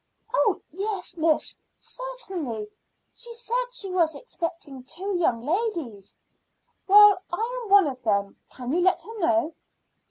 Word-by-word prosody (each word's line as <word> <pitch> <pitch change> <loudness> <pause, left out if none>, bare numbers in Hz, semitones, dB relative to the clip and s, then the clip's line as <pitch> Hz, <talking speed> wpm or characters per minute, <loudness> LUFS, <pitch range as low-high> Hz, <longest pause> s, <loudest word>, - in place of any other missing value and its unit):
"Oh - - +3
yes, 390 +1 -4
miss, 320 -2 0 0.2
certainly. 380 - -5 0.5
She 480 -1 -4
said 485 +1 0
she 405 -6 -1
was 335 -4 +2
expecting 330 - -6
two 365 +9 -3
young 245 -9 +1
ladies." 320 - -2 0.7
"Well, 410 -1 +8
I 460 +8 -2
am 435 - -9
one 400 -2 +7
of 260 -3 -4
them. 200 -3 0
Can 250 0 -6
you 345 +4 +2
let 370 +1 +3
her 450 0 -9
know?" 335 -2 +2
355 Hz, 135 wpm, -25 LUFS, 290-430 Hz, 0.7 s, Well